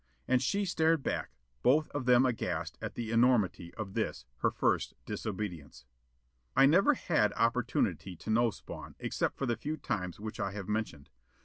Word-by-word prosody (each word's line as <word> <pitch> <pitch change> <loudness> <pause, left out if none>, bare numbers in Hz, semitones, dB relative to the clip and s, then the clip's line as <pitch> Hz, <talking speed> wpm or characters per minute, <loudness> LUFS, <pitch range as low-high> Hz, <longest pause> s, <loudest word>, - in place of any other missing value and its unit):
And 130 0 +3
she 200 +10 +1
stared 165 -4 +2
back, - - -2 0.3
both 150 +5 +4
of 130 -3 -4
then 125 +1 +6
aghast 125 -3 -2
at - - -5
the 115 -2 -4
enormity 115 -7 +3
of 100 -3 -5
this, 110 - -2
her - - +2
first - - 0
disobedience. 90 - -5 0.7
I 135 - +7
never 195 - +5
had 110 - +1
opportunity 115 -4 0
to 110 - -5
know 115 +2 +4
Spawn, - - -9
except - - -2
for 135 - -1
the 120 -2 +1
few 155 +2 -3
times 95 - -3
which 110 +2 -6
I 100 -1 -2
have 100 -2 -6
mentioned. 105 -9 -3
115 Hz, 170 wpm, -31 LUFS, 100-135 Hz, 0.7 s, I